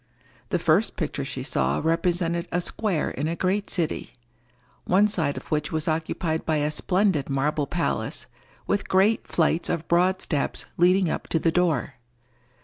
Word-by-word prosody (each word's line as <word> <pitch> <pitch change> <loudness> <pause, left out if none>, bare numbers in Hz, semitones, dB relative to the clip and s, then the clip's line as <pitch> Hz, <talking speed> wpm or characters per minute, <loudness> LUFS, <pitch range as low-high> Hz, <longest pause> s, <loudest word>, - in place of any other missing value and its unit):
The - - +1
first - - +2
picture - - -3
she - - -4
saw 70 +2 0
represented 170 +1 0
a 175 - +1
square 180 -2 -1
in 145 +4 -3
a 165 - -1
great 195 +3 -1
city, 170 -4 -2 0.7
one 200 +3 +4
side 160 -9 0
of - - -10
which 150 -1 0
was 155 -2 -1
occupied 160 0 -1
by 160 - 0
a 150 0 0
splendid 180 -2 +1
marble 140 +2 0
palace, 175 +3 -2 0.4
with 205 0 -1
great 195 +4 +3
flights 165 0 +1
of 170 -1 -2
broad 180 +2 +3
steps 145 -7 -2
leading 180 +2 +4
up - - -3
to - - 0
the 165 +1 +1
door. 165 -6 0
170 Hz, 160 wpm, -25 LUFS, 155-185 Hz, 0.7 s, one